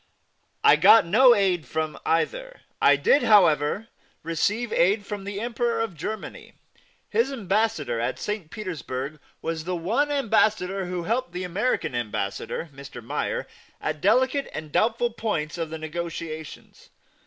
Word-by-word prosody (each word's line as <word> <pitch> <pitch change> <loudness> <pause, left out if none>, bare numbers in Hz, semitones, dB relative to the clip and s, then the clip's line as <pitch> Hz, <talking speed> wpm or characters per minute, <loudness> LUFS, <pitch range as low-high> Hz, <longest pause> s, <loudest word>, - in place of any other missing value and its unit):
I 150 - +7
got 205 +5 +7
no 240 +7 +6
aid 185 - +1
from 155 +2 -2
either. - - -1 0.2
I - - +6
did, 450 -11 +3
however, 185 0 +4 0.3
receive 205 +8 -1
aid 200 +4 +2
from 205 -2 -6
the 200 0 -4
Emperor 235 0 -1
of 225 -4 -2
Germany. 210 +8 -6 0.5
His 230 +5 +1
Ambassador 215 - 0
at 115 - -2
St. 210 -6 -4
Petersburg 155 - -5 0.2
was 165 -1 -3
the 180 0 -2
one 190 - 0
Ambassador 215 -8 +1
who 180 -1 -3
helped 235 +3 -1
the 180 +1 -4
American 180 - -1
Ambassador, 115 +5 -3
Mr. 140 -3 -10
Meyer, - - -3 0.3
at 155 -1 -3
delicate 260 +7 +2
and 155 -1 -6
doubtful 235 +6 +1
points 175 -9 -3
of 165 -1 -2
the 160 - -5
negotiations. 160 -1 -7
185 Hz, 140 wpm, -25 LUFS, 155-225 Hz, 0.5 s, I